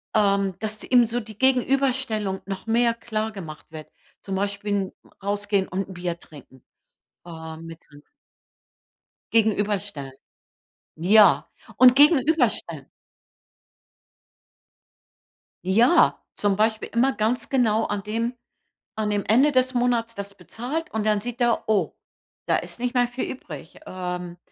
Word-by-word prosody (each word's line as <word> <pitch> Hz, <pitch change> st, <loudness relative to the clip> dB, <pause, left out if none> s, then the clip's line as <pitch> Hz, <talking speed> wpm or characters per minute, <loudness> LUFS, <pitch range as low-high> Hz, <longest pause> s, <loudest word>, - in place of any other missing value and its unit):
ähm, 200 Hz, -3 st, +2 dB
dass 215 Hz, 0 st, -4 dB
ihm 245 Hz, -3 st, +4 dB
so 240 Hz, +2 st, -1 dB
die 215 Hz, -1 st, -12 dB
Gegenüberstellung 260 Hz, -6 st, +1 dB
noch 195 Hz, +2 st, -6 dB
mehr 235 Hz, +1 st, +3 dB
klargemacht 215 Hz, -9 st, -6 dB
wird, 155 Hz, -1 st, -9 dB, 0.3 s
zum 195 Hz, -1 st, -5 dB
Beispiel 200 Hz, +1 st, -2 dB
'n 195 Hz, -2 st, -2 dB, 0.3 s
rausgehen 205 Hz, -1 st, 0 dB
und 190 Hz, +2 st, -3 dB
'n -, -, -8 dB
Bier 175 Hz, -1 st, -4 dB
trinken, 135 Hz, -4 st, -16 dB, 0.6 s
ähm, 160 Hz, -1 st, -9 dB
mit 165 Hz, 0 st, -11 dB
sein 145 Hz, 0 st, -17 dB, 1.3 s
Gegenüberstellen. 205 Hz, -10 st, 0 dB, 0.8 s
Ja, 205 Hz, +6 st, +5 dB, 0.3 s
und 255 Hz, -1 st, +7 dB
gegenüberstellen. 270 Hz, -, +3 dB, 2.8 s
Ja, 235 Hz, -, +4 dB
zum 205 Hz, -2 st, +1 dB
Beispiel 220 Hz, +1 st, 0 dB
immer 260 Hz, +3 st, +2 dB
ganz 230 Hz, +2 st, -1 dB
genau 225 Hz, -4 st, +2 dB
an 205 Hz, -1 st, -3 dB
dem 230 Hz, +4 st, -2 dB, 0.6 s
an 215 Hz, -1 st, -1 dB
dem 205 Hz, -1 st, 0 dB
Ende 260 Hz, +8 st, +4 dB
des 255 Hz, 0 st, +2 dB
Monats 240 Hz, -2 st, 0 dB
das 200 Hz, 0 st, -7 dB
bezahlt. 250 Hz, -, -5 dB
Und 220 Hz, -1 st, -2 dB
dann 210 Hz, -1 st, +2 dB
sieht 245 Hz, +2 st, -6 dB
er: 240 Hz, -1 st, +2 dB
„Oh, 210 Hz, -3 st, +1 dB, 0.5 s
da -, -, +3 dB
ist -, -, -6 dB
nicht 245 Hz, +1 st, -2 dB
mehr 245 Hz, -1 st, +3 dB
viel 245 Hz, +1 st, -4 dB
übrig.“ 160 Hz, -, -10 dB
Ähm, 180 Hz, -1 st, -5 dB
215 Hz, 125 wpm, -24 LUFS, 190-240 Hz, 2.8 s, und